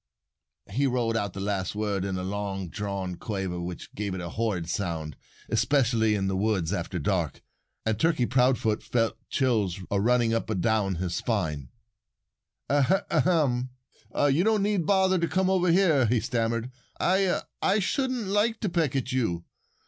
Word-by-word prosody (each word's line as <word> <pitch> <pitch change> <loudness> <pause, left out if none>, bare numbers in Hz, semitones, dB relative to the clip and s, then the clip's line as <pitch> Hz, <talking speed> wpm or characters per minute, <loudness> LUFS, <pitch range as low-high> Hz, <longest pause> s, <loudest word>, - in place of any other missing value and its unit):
He 135 +7 +1
rolled 120 -3 0
out 100 -4 -1
the - - -6
last 100 -1 -2
word 105 -3 -1
in 95 -1 -2
a 90 - -3
long 95 -1 -3
drawn 95 -2 -4
quaver 95 -5 -3
which 85 0 -7
gave 100 -2 -3
it - - -4
a 85 -1 -5
horrid 100 -5 -2
sound 80 -4 -3 0.3
especially 115 -2 +2
in 95 -2 0
the 95 - 0
woods, 95 -3 0
after 95 -2 -3
dark. 85 -2 -1 0.4
And 110 -1 0
Turkey 160 -7 +2
Proudfoot 125 -4 +2
felt 115 -2 0
chills 110 -9 +1
a 100 -1 +2
running 120 0 +3
up 115 - -1
and 105 -4 -1
down 105 -2 +1
his 90 0 -2
back. 90 -10 -1 1.1
"A 145 +8 +3
ahem! 135 -8 +2 0.5
You 145 - +3
you 185 +11 +3
needn't 200 -5 0
bother 190 -2 +3
to 170 - +1
come 190 +1 +1
over 180 -1 +2
here," 165 -9 +4
he 120 +2 +2
stammered. 115 +1 -1 0.3
"I 190 0 +2 0.2
I 200 - +3
shouldn't 255 +3 0
like 210 +3 +1
to 210 - 0
peck 165 -6 0 0.2
you. 110 -10 -1
115 Hz, 165 wpm, -27 LUFS, 95-145 Hz, 1.1 s, here